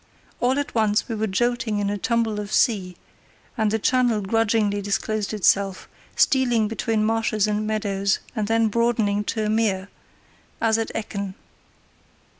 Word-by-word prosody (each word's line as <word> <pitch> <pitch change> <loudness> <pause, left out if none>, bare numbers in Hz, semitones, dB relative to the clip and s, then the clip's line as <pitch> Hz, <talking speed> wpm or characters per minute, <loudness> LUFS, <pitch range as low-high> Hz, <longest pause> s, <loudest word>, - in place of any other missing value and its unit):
All 255 +2 +1
at 285 - -3
once 215 -2 +1
we 235 - -3
were 220 0 -1
jolting 235 +1 0
in 200 0 0
a - - -1
tumble 230 -1 0
of 205 0 -6
sea, 190 -7 +1 0.6
and 220 -3 +1
the 220 - +1
channel 245 0 +2
grudgingly 210 0 +1
disclosed 205 +1 -2
itself, 200 -2 +1 0.3
stealing 245 -5 +3
between 220 0 -1
marshes 220 -2 +1
and 210 0 -1
meadows 200 -2 0 0.2
and 215 -2 -1
then 225 0 +2
broadening 215 -2 +1
to 220 0 -1
a - - -1
mere, 200 -4 0 0.7
as 225 0 +2
at 225 - -2
Ekken. 200 -3 -4
215 Hz, 150 wpm, -23 LUFS, 205-225 Hz, 0.7 s, stealing